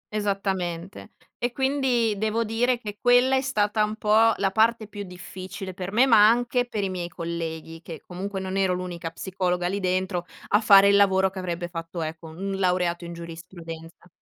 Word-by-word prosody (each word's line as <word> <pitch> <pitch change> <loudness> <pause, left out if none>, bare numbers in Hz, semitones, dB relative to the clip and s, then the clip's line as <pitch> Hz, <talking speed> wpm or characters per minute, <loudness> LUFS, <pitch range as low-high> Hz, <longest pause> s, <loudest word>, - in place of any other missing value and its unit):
Esattamente. 195 -3 -3 0.3
E, 245 - -1
quindi 265 -4 +1
devo 220 +2 0
dire, 240 +3 +1
che 210 -3 -8
quella 245 +2 +5
è 265 - +2
stata 215 -5 +1
un 210 0 -2
po' 220 +1 +4
la 195 -1 +1
parte 225 +2 +2
più 205 -1 -8
difficile 185 +1 -8
per 180 +1 -6
me, 235 +5 +5
ma 215 -5 +7
anche 245 +1 +1
per 215 -4 -3
i 195 - -1
miei 175 -2 -4
colleghi, 165 -1 -5
che 165 - -8
comunque 190 +2 -5
non 190 0 -4
ero 190 -2 +2
l'unica 175 -2 -5
psicologa 180 0 -2
lì 195 +3 -2
dentro, 185 -1 -1 0.2
a 205 - +4
fare 200 -2 +7
il 200 - +5
lavoro 190 -1 +4
che 195 - -7
avrebbe 175 -1 -3
fatto, 165 0 -5
ecco, 160 +1 -6
un 195 +4 -5
laureato 180 -2 0
in 170 - -7
giurisprudenza. 165 0 -10
190 Hz, 180 wpm, -25 LUFS, 175-215 Hz, 0.3 s, ma